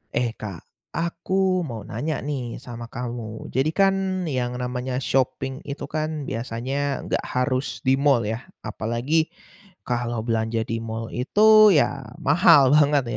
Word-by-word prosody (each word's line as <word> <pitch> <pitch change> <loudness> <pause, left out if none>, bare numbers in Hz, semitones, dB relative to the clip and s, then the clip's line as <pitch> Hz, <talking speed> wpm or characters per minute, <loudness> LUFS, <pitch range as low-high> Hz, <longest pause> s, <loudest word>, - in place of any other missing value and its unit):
Eh 120 -1 +1
Kak, 95 -6 -7 0.3
aku 180 +2 0
mau 115 -5 -6
nanya 135 +8 -3
nih 130 -5 -4
sama 120 -1 -8
kamu. 120 -3 -6
Jadi 135 +5 +1
kan 195 -1 +2
yang 125 -6 -2
namanya 125 +1 -3
shopping 130 +1 0
itu 140 0 -5
kan 155 -1 -3
biasanya 130 +4 -3
nggak - - -1
harus 125 -1 -1
di 135 +1 +3
mall 140 -4 +3
ya. 110 - -4 0.2
Apalagi 120 +9 0 0.6
kalo 120 -1 -2
belanja 115 0 0
di 115 - -2
mall 115 0 -5
itu 215 - +6
ya 140 -2 +1 0.2
mahal 150 -3 +6
banget 145 -2 +4
130 Hz, 135 wpm, -24 LUFS, 120-155 Hz, 0.6 s, itu